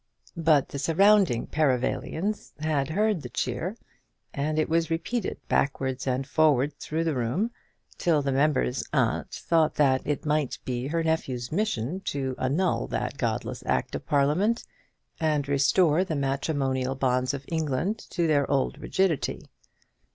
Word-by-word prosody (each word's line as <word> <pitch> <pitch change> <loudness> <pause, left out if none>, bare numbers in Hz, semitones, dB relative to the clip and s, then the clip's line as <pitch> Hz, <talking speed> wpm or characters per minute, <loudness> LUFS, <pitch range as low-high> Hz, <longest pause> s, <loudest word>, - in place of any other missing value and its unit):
But 160 -4 +3
the 140 - -5
surrounding 185 - +4
Perivalians 155 - -1
had 150 -3 0
heard 205 +1 +1
the - - -7
cheer, 165 - -3 0.6
and 150 +2 -1
it 155 - +2
was 165 0 +1
repeated 185 +7 -2
backwards 130 -2 0
and 130 +1 0
forwards 145 -1 +3
through 160 +2 -2
the 165 -2 0
room, 130 - -1 0.5
till 155 -4 +2
the 140 - 0
member's 135 - +1
aunt - - +1
thought 160 -2 +1
that 135 -3 +3
it 145 +1 -2
might 150 -3 0
be 125 0 -2
her 165 +2 0
nephew's 130 -7 -1
mission 175 - -1
to 135 -2 -2
annul 140 - 0
that - - -3
godless - - -2
Act - - 0
of - - -5
Parliament, 155 +12 +2 0.6
and 150 -3 +1
restore 150 +4 +3
the 170 -4 -3
matrimonial 135 -2 -1
bonds 130 0 +1
of 135 0 -8
England 160 +6 -1
to 170 -1 0
their 145 -3 +2
old 135 -1 0
rigidity. 190 -6 0
150 Hz, 145 wpm, -27 LUFS, 135-165 Hz, 0.6 s, surrounding